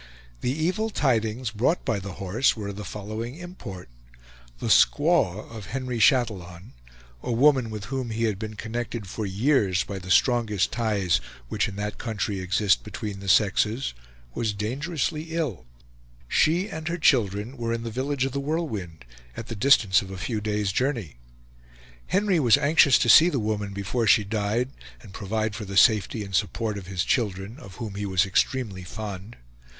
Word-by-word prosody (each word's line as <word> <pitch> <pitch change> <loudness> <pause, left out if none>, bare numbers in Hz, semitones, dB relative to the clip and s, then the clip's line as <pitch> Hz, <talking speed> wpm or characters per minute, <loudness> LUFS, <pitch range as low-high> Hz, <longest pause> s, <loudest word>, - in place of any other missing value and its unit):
The - - -1
evil 180 +10 -1
tidings 120 - 0
brought 120 +11 0
by 110 -3 0
The 95 -1 -7
Horse 100 +8 +1
were 105 -2 -4
of 100 - -6
the 105 - -6
following 110 +6 -6
import: 160 - -9 0.7
The - - -6
squaw 145 - +3
of 110 -5 -8
Henry 125 -1 -3
Chatillon, 105 -7 +1 0.5
a - - -3
woman 130 0 +4
with 105 -2 -6
whom 130 -3 -2
he 115 +1 -2
had 105 -4 0
been 110 -1 -6
connected 115 0 -4
for 105 +3 -4
years 100 -2 +2
by 100 -1 -6
the 90 0 -10
strongest 110 -2 +2
ties 105 -7 +1 0.3
which - - 0
in 95 - -7
that 105 +1 -4
country 105 -3 -3
exist 95 - +2
between 100 - -6
the 100 0 -5
sexes, 105 - +2 0.4
was 110 - -1
dangerously 150 - -3
ill. 130 - -3 0.6
She 170 - +2
and 160 -6 -6
her 170 0 -1
children 115 - +2
were 115 -2 -3
in 115 0 -2
the 115 - -4
village 130 +3 -1
of 135 - -2
The 140 - -2
Whirlwind, 110 - -4 0.3
at 115 - -7
the 115 - -4
distance 105 -4 +4
of 95 - -9
a 95 - -7
few 105 +3 -3
days' 105 -2 -1
journey. 115 - -2 0.9
Henry 195 -2 +2
was 120 -6 +5
anxious 145 -3 +5
to - - 0
see 160 +8 +8
the 145 - -1
woman 105 -3 -2
before 100 +4 -2
she 105 - +5
died, 110 +4 -1 0.3
and 100 -4 -13
provide 110 +2 -2
for 100 +2 -6
the 100 0 -4
safety 110 -1 +4
and 100 -1 -9
support 105 +3 0
of 90 - -12
his 95 -2 -1
children, 105 0 -1
of 95 -2 -12
whom 110 -5 -6
he 100 +1 -4
was 95 -1 +2
extremely 100 -1 0
fond. 100 +2 -7
110 Hz, 175 wpm, -25 LUFS, 100-130 Hz, 0.9 s, see